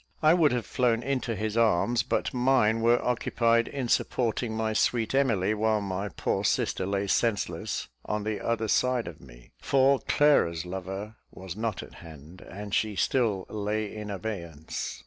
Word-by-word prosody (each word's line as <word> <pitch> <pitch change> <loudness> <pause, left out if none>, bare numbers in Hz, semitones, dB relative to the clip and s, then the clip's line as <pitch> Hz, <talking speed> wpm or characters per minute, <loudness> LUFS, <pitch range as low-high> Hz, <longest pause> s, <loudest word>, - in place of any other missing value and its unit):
I 155 +1 +7
would 165 -4 +4
have 120 -3 -1
flown 120 -2 +1
into 130 -3 -1
his 110 +1 -3
arms, 115 +1 +3
but 125 - -1
mine 125 -3 +3
were 120 +1 +4
occupied 115 -1 +2
in 135 -3 -4
supporting 115 -1 0
my 110 -1 0
sweet 115 +2 +1
Emily, 110 -8 +2
while 110 0 +1
my 100 0 -3
poor - - -2
sister 95 - 0
lay 100 0 -1
senseless 105 -2 -1 0.2
on 105 0 -2
the 110 -1 -3
other 115 -1 0
side 125 +2 +1
of 85 -3 -9
me; - - -16
for 135 0 +3
Clara's 85 - +2
lover 95 +4 -6
was 95 -2 -9
not 110 -2 -3
at - - -13
hand, 80 +2 -12
and 100 +2 -8
she 110 -2 +1
still 105 -5 +1
lay 105 0 -3
in 105 -1 -6
abeyance. 90 -6 -5
110 Hz, 165 wpm, -27 LUFS, 95-120 Hz, 0.2 s, I